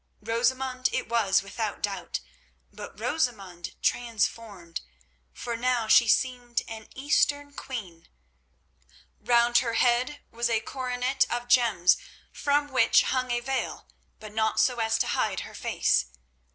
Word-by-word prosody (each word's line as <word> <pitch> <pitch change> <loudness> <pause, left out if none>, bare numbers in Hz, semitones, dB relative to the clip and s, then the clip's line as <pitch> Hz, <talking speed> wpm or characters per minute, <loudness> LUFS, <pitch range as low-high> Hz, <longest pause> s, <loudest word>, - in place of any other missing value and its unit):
Rosamund 255 +3 0
it - - -2
was 205 -4 +2
without 210 +1 -4
doubt, 200 -1 -3 0.5
but - - -10
Rosamund 200 - -2
transformed, 220 -6 -2 0.5
for 235 - -5
now 240 -1 0
she 235 +2 +6
seemed 245 0 +1
an 220 -1 -8
Eastern 285 +1 +1
queen. 190 -13 -7 1.1
Round 240 0 +4
her 235 -2 -2
head 250 +5 +1
was 235 0 -1
a 225 -1 +2
coronet 255 +2 -1
of 240 0 -3
gems 225 -8 +4 0.3
from 290 0 0
which 255 -3 +5
hung 255 -1 -1
a 240 0 0
veil, 265 +1 -3 0.3
but 215 -1 -10
not 220 0 +1
so 250 -2 +2
as 225 0 +1
to - - +1
hide - - -1
her - - -9
face. 60 - +1
240 Hz, 130 wpm, -27 LUFS, 220-255 Hz, 1.1 s, she